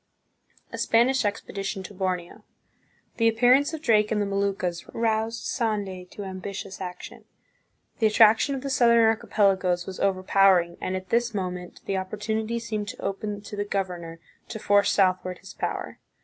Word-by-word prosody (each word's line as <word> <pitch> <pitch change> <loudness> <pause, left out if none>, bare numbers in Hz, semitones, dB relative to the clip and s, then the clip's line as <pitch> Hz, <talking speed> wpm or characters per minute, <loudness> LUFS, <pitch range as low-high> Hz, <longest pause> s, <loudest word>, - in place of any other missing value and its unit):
A - - -5
Spanish 245 +3 +3
Expedition 195 -1 -3
to 205 - -9
Borneo. 180 -2 -3 0.7
The 230 - +3
appearance 250 +6 +4
of 315 -1 -7
Drake 215 -4 +3
in 220 - +1
the 205 - +1
Moluccas 195 -3 -1
roused 225 0 0
Sande 200 -6 -2
to 205 - -8
ambitious 190 0 -7
action. 180 -1 -8 0.7
The 220 - +4
attraction 220 +5 +5
of 265 - -5
the 275 0 -4
southern 235 -3 +4
archipelagoes 195 -5 +2
was 190 - -7
over 190 -1 0
powering, 185 -3 +4
and 185 - -2
at 185 0 -6
this 235 -1 +1
moment 180 -2 -5
the 195 - -1
opportunity 215 +4 -3
seemed 215 -3 -4
to - - -7
open 205 +1 -3
to 205 0 -8
the 205 - -1
governor 180 -5 -4 0.3
to 220 - -6
force 205 -1 +3
southward 185 -2 +1
his 190 0 -12
power. - - -4
200 Hz, 160 wpm, -25 LUFS, 185-225 Hz, 0.7 s, attraction